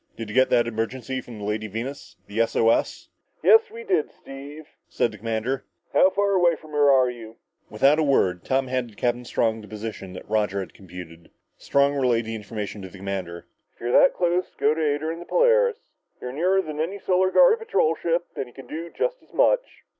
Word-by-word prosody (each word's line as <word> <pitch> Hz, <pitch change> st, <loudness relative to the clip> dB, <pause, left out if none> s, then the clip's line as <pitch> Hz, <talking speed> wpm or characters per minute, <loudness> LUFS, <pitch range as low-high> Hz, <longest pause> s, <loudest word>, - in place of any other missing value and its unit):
"Did 115 Hz, -2 st, -6 dB
you -, -, -6 dB
get 130 Hz, 0 st, +4 dB
that 120 Hz, -, +3 dB
emergency 120 Hz, +3 st, -3 dB
from 120 Hz, -3 st, -11 dB
the 105 Hz, -, -8 dB
Lady 105 Hz, +1 st, -2 dB
Venus 120 Hz, +7 st, -6 dB
the 105 Hz, +2 st, -5 dB
S 115 Hz, -, +1 dB
O 115 Hz, 0 st, +4 dB
S?" -, -, -1 dB, 0.3 s
"Yes, 450 Hz, 0 st, +6 dB
we 460 Hz, +2 st, -9 dB
did, 430 Hz, +1 st, 0 dB
Steve," 140 Hz, +3 st, -11 dB, 0.2 s
said 115 Hz, -, 0 dB
the 105 Hz, -, -12 dB
commander. 115 Hz, +4 st, -2 dB, 0.3 s
"How 185 Hz, -, +6 dB
far 200 Hz, +1 st, 0 dB
away 175 Hz, -3 st, +4 dB
from 155 Hz, -1 st, -15 dB
her 145 Hz, -1 st, +4 dB
are 130 Hz, -2 st, +4 dB
you?" 115 Hz, -2 st, -11 dB, 0.3 s
Without 135 Hz, +8 st, +3 dB
a -, -, +3 dB
word, 95 Hz, -, +2 dB
Tom 135 Hz, 0 st, +1 dB
handed 120 Hz, -1 st, -2 dB
Strong 110 Hz, -1 st, 0 dB
the 105 Hz, -, -12 dB
position 105 Hz, -3 st, -7 dB
that -, -, -10 dB
Roger 105 Hz, -2 st, 0 dB
had 95 Hz, -, -6 dB
computed. 85 Hz, -3 st, -12 dB, 0.3 s
Strong 140 Hz, 0 st, +2 dB
relayed 120 Hz, -4 st, +1 dB
the 115 Hz, -, -5 dB
information 105 Hz, -1 st, -6 dB
to 95 Hz, -, -8 dB
the 95 Hz, -, -13 dB
commander. 95 Hz, -3 st, -5 dB, 0.3 s
"If -, -, -34 dB
you're 120 Hz, +1 st, -2 dB
that 270 Hz, -, +5 dB
close, 180 Hz, 0 st, 0 dB
go 145 Hz, +2 st, +3 dB
to 160 Hz, -, -3 dB
her 150 Hz, -2 st, +2 dB
aid 145 Hz, -, -7 dB
in 165 Hz, +1 st, -3 dB
the 175 Hz, -, -9 dB
Polaris. -, -, +2 dB, 0.3 s
You're 125 Hz, -, -6 dB
nearer 185 Hz, +6 st, +2 dB
than 155 Hz, -2 st, -6 dB
any 175 Hz, +6 st, -2 dB
Solar 185 Hz, -1 st, +2 dB
Guard 475 Hz, -, +5 dB
patrol 445 Hz, -, +1 dB
ship 170 Hz, +1 st, -1 dB
and 130 Hz, -, -4 dB
you 120 Hz, -, -17 dB
can 135 Hz, -, -11 dB
do 165 Hz, +2 st, -6 dB
just -, -, -2 dB
as -, -, -26 dB
much." -, -, +1 dB
130 Hz, 215 wpm, -24 LUFS, 110-170 Hz, 0.3 s, Yes